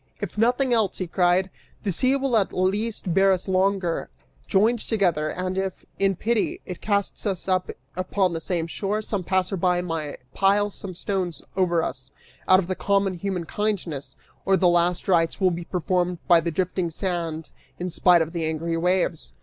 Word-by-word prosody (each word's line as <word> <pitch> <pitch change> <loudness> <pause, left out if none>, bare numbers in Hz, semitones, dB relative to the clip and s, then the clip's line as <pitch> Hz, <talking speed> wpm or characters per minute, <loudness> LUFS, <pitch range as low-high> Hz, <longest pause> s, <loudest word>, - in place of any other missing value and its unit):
"If - - -5
nothing 245 +4 +2
else," 220 -5 +1
he 185 - -2
cried, 180 +2 +2 0.3
"the 200 - 0
sea 255 +9 +2
will 270 -3 0
at 205 -3 +2
least 195 0 -1
bear 195 +1 +5
us 185 0 0
longer, 190 -2 +1 0.4
joined 225 +5 +3
together, 175 -9 +1
and 185 +3 -2
if, 190 -1 -4
in 195 -1 +2
pity, 225 +4 0
it 180 - -7
casts 200 0 -1
us 190 -2 -2
up 185 -1 +1 0.3
upon 185 0 0
the 165 - -3
same 170 -1 -1
shore, 205 +5 -2
some 205 -3 -2
passerby 185 -1 +1
may 160 -4 -4 0.2
pile 205 +1 +2
some 190 -2 -8
stones 180 -4 -3
over 175 -3 +2
us, 130 -2 -5 0.4
out 185 - +7
of 185 0 -2
common 200 -1 +2
human 180 -1 -3
kindness, 180 -8 -3 0.3
or 195 0 +3
the 180 - +3
last 175 0 +2
rites 165 -3 +2
will 185 -2 +3
be 170 0 -4
performed 180 0 0
by 170 -1 +7
the 170 - -2
drifting 180 +1 -1
sand, 165 -2 -3 0.3
in 180 0 -4
spite 175 0 +5
of 160 - -7
the 170 -2 -2
angry 165 +1 -2
waves." 180 -1 0
185 Hz, 175 wpm, -24 LUFS, 170-195 Hz, 0.4 s, out